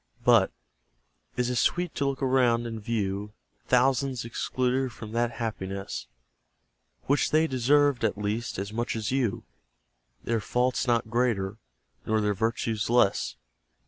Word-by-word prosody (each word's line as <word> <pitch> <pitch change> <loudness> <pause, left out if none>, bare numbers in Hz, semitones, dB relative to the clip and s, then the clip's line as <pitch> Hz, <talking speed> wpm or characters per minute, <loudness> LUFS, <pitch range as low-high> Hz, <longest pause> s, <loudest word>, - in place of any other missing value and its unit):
But, 115 -5 +5 0.9
is 125 0 +1
it 125 - -1
sweet 175 +6 +1
to 140 - 0
look 135 0 -2
around, 125 -3 +3
and 115 -1 -5
view 105 -2 -2 0.3
Thousands 130 0 +2
excluded 130 +2 -1
from 110 -2 -9
that 120 +1 0
happiness 100 -4 -4 1.0
Which 140 +2 +2
they 155 +1 +4
deserved, 140 0 +3
at 110 -2 +1
least, 110 +3 -2
as 100 +2 -4
much 120 +1 -2
as 110 0 -2
you. 130 -6 0 0.8
Their 115 -1 0
faults 125 +4 0
not 115 -2 +1
greater, 115 -4 0 0.4
nor 110 0 +1
their 105 -1 +1
virtues 110 +1 -1
less? 100 - +2
115 Hz, 135 wpm, -27 LUFS, 110-125 Hz, 1.0 s, But